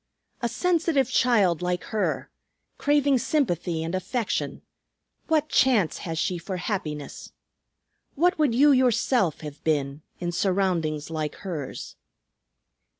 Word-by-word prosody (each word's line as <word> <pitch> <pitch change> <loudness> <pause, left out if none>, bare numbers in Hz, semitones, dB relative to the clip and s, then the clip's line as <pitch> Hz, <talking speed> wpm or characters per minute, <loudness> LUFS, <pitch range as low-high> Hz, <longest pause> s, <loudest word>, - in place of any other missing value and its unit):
A 235 - 0
sensitive 320 -3 +1
child 200 -11 +3
like 180 0 -1
her, 215 - -1 0.5
craving 285 -2 +3
sympathy 175 - 0
and 165 +2 -4
affection, 210 +5 -2 0.6
what 310 -2 +2
chance 235 - +3
has 165 -4 -5
she 175 +2 -1
for 185 +2 -5
happiness? 155 -7 -5 0.8
What 350 +3 +2
would 285 -7 +2
you 290 +4 +6
yourself 245 - +2
have 150 -2 -9
been 145 -2 0 0.2
in 175 -1 -2
surroundings 175 -5 0
like 155 -2 -3
hers?" 155 -8 -6
190 Hz, 115 wpm, -25 LUFS, 165-260 Hz, 0.8 s, you